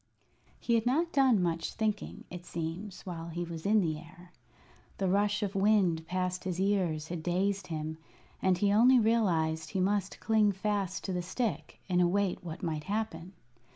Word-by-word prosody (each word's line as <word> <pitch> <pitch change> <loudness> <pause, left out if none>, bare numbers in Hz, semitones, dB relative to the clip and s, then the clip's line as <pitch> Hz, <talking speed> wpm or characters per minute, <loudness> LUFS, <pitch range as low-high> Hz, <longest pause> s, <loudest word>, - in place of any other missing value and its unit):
He 235 - 0
had 230 0 +2
not 325 +7 +1
done 260 -9 +4
much 165 -1 -1
thinking, 215 -2 -2
it 180 -1 -7
seems, 175 +4 -5
while 170 -2 -6
he 170 +1 -3
was 165 0 -5
in 215 0 +5
the 155 -4 -1
air. 175 +2 -15 0.7
The 195 - 0
rush 205 +2 +2
of 200 -1 -2
wind 195 -5 +2
past 185 0 -2
his 180 -1 -3
ears 180 -6 0
had 170 -2 -4
dazed 190 +3 0
him, 155 -1 -4 0.4
and 185 -1 +3
he 200 +2 +2
only 245 +5 +6
realized 170 -9 +2
he 190 - -2
must 195 +1 0
cling 215 -2 +3
fast 195 -1 -2
to 190 - -3
the 180 - -1
stick 175 - -3
and 180 -1 +2
await 185 +2 +1
what 165 +2 -7
might 155 -3 -2
happen. 195 -4 -3
185 Hz, 175 wpm, -31 LUFS, 170-205 Hz, 0.7 s, only